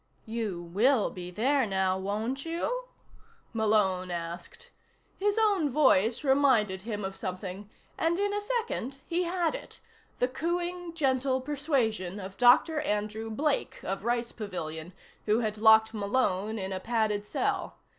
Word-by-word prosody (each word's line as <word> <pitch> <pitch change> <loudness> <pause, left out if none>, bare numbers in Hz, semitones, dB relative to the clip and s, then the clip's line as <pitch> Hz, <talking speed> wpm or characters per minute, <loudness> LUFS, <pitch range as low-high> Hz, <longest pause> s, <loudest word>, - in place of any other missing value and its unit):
"You 220 -6 -3
will 210 +7 +2
be 180 -1 -7
there, 255 +7 +1
now, 190 -1 +1
won't 215 +8 -2
you?" 425 +10 -2 0.7
Malone 210 -5 +2
asked. 170 0 -6 0.5
His 410 +2 +1
own 405 -9 +3
voice 245 -4 +3
reminded 260 -9 +3
him 210 -1 -4
of 195 0 -5
something, 185 +2 -6 0.3
and 330 +1 +2
in 405 +1 0
a 415 - -1
second 415 - -2
he 350 +1 0
had 345 -2 0
it: - - -8 0.4
the 250 - +2
cooing, 345 +4 -3
gentle 265 -3 +1
persuasion 255 - -1
of 190 0 -7
Dr. 250 +6 +5
Andrew 215 -3 -2
Blake 280 +6 -1
of 195 +1 -3
Rice 235 0 0
Pavilion, 175 -5 -6 0.3
who 215 +3 +3
had 215 -2 -2
locked 220 0 +6
Malone 210 -1 0
in 190 -1 -3
a 185 - -3
padded 215 -1 0
cell. 210 - -2
225 Hz, 140 wpm, -29 LUFS, 195-285 Hz, 0.7 s, locked